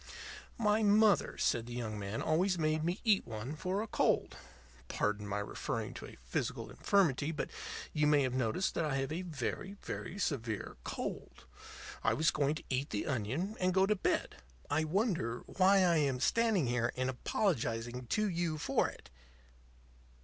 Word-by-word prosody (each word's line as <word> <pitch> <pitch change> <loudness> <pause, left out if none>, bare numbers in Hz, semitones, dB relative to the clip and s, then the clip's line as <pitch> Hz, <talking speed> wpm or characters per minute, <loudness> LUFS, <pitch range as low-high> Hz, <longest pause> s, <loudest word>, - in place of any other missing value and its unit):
"My 215 -1 +3
mother," 210 0 +4
said 115 -1 +1
the 120 - -6
young 110 -3 -3
man, 100 +2 -3
"always 180 +4 +2
made 155 -1 +1
me 175 +4 -1
eat 215 -4 +3
one 115 +6 -5
for 185 +6 -1
a - - -6
cold. - - +1 0.5
Pardon 105 - -1
my 105 0 -2
referring 100 - -3
to - - -8
a - - -13
physical 60 - -3
infirmity; 160 -7 +2
but 150 - -4 0.4
you 150 -1 +3
may 150 -1 +5
have 130 -1 -1
noticed 130 +8 0
that 165 - 0
I 150 -3 0
have 135 +1 -1
a 165 +3 -2
very, 180 +4 -4
very 195 - -5
severe 115 - -2
cold. - - -5 0.6
I - - +3
was 160 +1 +3
going 145 0 +1
to - - -7
eat 135 +2 -1
the 105 - -2
onion 140 - -2
and 185 0 +1
go 190 0 +5
to 210 +2 +2
bed. 185 - -1 0.3
I 155 +2 +2
wonder 165 - 0
why 190 +1 +4
I 170 -2 +4
am 140 -4 +1
standing 220 - +2
here 120 0 +1
and 130 0 0
apologizing 125 - -1
to 215 - +1
you 170 -4 -1
for - - +1
it." - - -14
155 Hz, 170 wpm, -33 LUFS, 120-190 Hz, 0.6 s, may